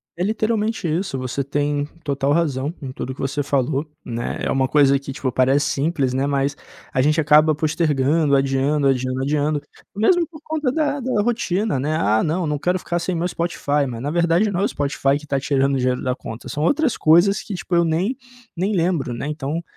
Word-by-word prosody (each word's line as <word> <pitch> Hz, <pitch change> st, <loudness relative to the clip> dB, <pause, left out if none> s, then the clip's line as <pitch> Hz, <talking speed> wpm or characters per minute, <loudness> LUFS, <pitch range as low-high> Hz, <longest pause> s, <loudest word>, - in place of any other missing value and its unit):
É 175 Hz, -, -2 dB
literalmente 215 Hz, -2 st, 0 dB
isso, 165 Hz, -2 st, -1 dB
você 130 Hz, +2 st, -3 dB
tem 145 Hz, +1 st, -1 dB, 0.2 s
total 140 Hz, -1 st, 0 dB
razão 145 Hz, -3 st, 0 dB
em 130 Hz, -, -5 dB
tudo 130 Hz, 0 st, -5 dB
que -, -, -20 dB
você 140 Hz, +2 st, -1 dB
falou, 140 Hz, 0 st, 0 dB, 0.2 s
né. 120 Hz, 0 st, -3 dB
É -, -, 0 dB
uma 130 Hz, -1 st, +2 dB
coisa 140 Hz, -1 st, +4 dB
que, 140 Hz, 0 st, -7 dB
tipo, 130 Hz, -1 st, -3 dB
parece 135 Hz, +3 st, +2 dB
simples, 140 Hz, -3 st, 0 dB
né, 135 Hz, +2 st, 0 dB
mas 140 Hz, 0 st, 0 dB, 0.4 s
a 130 Hz, -, +2 dB
gente 150 Hz, +4 st, +2 dB
acaba 155 Hz, 0 st, +5 dB
postergando, 150 Hz, -1 st, +1 dB
adiando, 135 Hz, +2 st, +1 dB
adiando, 130 Hz, 0 st, 0 dB
adiando, 145 Hz, +1 st, 0 dB, 0.3 s
mesmo 335 Hz, -, +3 dB
por 310 Hz, -1 st, -13 dB
conta 310 Hz, -5 st, -1 dB
da 290 Hz, -1 st, 0 dB
da 250 Hz, -5 st, 0 dB
rotina, 210 Hz, -, 0 dB
né: 150 Hz, +3 st, -1 dB
"Ah 105 Hz, +2 st, +2 dB
não, 165 Hz, +2 st, 0 dB
não 150 Hz, -1 st, -1 dB
quero 180 Hz, +4 st, +1 dB
ficar 175 Hz, -1 st, -2 dB
sem 180 Hz, +1 st, -2 dB
meu 170 Hz, +1 st, 0 dB
Spotify", 150 Hz, -5 st, -1 dB
mas 115 Hz, -2 st, -6 dB
na 145 Hz, -, -2 dB
verdade 170 Hz, +5 st, +2 dB
não 180 Hz, -, -1 dB
é -, -, +1 dB
o -, -, +2 dB
Spotify 140 Hz, -1 st, 0 dB
que 150 Hz, -, -12 dB
tá 140 Hz, -2 st, -1 dB
tirando 140 Hz, 0 st, +1 dB
o -, -, +1 dB
dinheiro 125 Hz, 0 st, 0 dB
da 125 Hz, -1 st, 0 dB
conta, 115 Hz, -2 st, -8 dB
são 150 Hz, -, -4 dB
outras 290 Hz, -, +2 dB
coisas 175 Hz, +6 st, +4 dB
que 200 Hz, -, -6 dB
tipo 175 Hz, +1 st, -6 dB
eu 170 Hz, -, +4 dB
nem 170 Hz, +10 st, 0 dB, 0.4 s
nem 195 Hz, +5 st, 0 dB
lembro, 165 Hz, -8 st, 0 dB
né. 120 Hz, -, -5 dB
Então 150 Hz, +2 st, -3 dB
150 Hz, 210 wpm, -21 LUFS, 135-175 Hz, 0.4 s, acaba